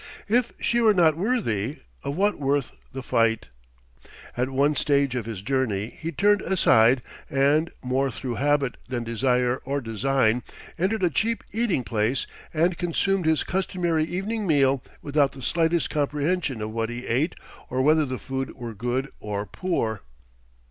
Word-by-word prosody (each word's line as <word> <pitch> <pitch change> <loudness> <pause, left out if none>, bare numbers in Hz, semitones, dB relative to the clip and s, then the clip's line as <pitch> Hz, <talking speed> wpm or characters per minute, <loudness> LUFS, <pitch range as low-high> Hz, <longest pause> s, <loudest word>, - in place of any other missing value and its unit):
If 235 +2 +2
she 240 0 +1
were 220 -2 +5
not 165 -4 +5
worthy, 155 - -1 0.2
of 140 - -3
what 205 +4 +1
worth 140 -2 0 0.2
the 135 0 -6
fight?... 115 -2 +1 0.9
At 125 +2 0
one 140 +3 +2
stage 140 -2 +2
of 120 -3 -3
his 105 -4 -6
journey, 120 -5 -1
he 160 +1 -6
turned 205 +2 +3
aside 125 -9 +4 0.3
and, 145 +4 +3
more 130 +2 +1
through 125 +1 -4
habit 145 -2 +1
than 120 -2 -2
desire 125 +2 +1
or 140 +2 -3
design, 120 0 +1 0.3
entered 190 +4 0
a 175 - +3
cheap 225 - 0
eating 215 - 0
place 115 +3 0 0.3
and 170 +2 +1
consumed 180 +1 0
his 160 -1 +3
customary 175 -4 0
evening 200 +5 -3
meal 135 -4 +3 0.2
without 145 -1 +2
the 135 -2 -10
slightest 165 +2 +1
comprehension 145 -3 -1
of 110 - -4
what 115 0 -2
he 120 +1 -6
ate 140 +8 0 0.3
or 130 +1 0
whether 155 +2 +4
the 130 -3 -3
food 135 +1 -4
were 120 -3 -6
good 125 +5 -2
or 105 -1 -3
poor. 110 - -2
140 Hz, 155 wpm, -25 LUFS, 125-170 Hz, 0.9 s, were